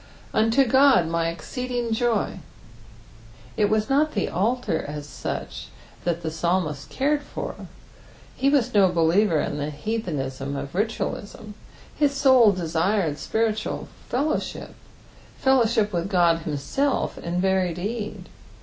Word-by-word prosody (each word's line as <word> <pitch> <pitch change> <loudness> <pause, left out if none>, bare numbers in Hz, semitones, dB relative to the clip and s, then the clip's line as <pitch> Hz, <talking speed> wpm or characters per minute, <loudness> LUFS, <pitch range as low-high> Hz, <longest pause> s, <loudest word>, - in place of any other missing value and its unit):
"ITnto 225 +5 +3
Ood 260 - +5
my 165 0 0
exeeedisg 245 +7 -4
joy," 225 -1 0 1.2
It 210 - +3
was 215 0 +1
not 300 +3 +2
the 200 - -1
altar 220 -1 0
as 150 0 -6
such - - -5 0.4
that 170 -1 -1
the 160 - -1
mslmist 160 -3 -1
cared 290 +2 0
for, - - -7 0.7
he 275 - +2
was 280 -5 +2
no 200 -3 +5
believer 170 +1 +3
in 145 - -2
the 145 +1 -2
heathenism 145 - -3
of 140 0 -5
ritaalism: 210 +1 -3 0.4
his 285 -2 +2
soul 260 -6 +6
desired 170 -2 0
spiritual 220 -1 -1 0.2
fellowship, 285 +6 -2 0.6
fellowship 230 -6 +2
with 175 +3 -2
Qod 170 -3 +3
himself 155 - -1
in 175 +1 -3
very 190 -1 +2
deed. 210 +5 -5
205 Hz, 120 wpm, -24 LUFS, 165-240 Hz, 1.2 s, soul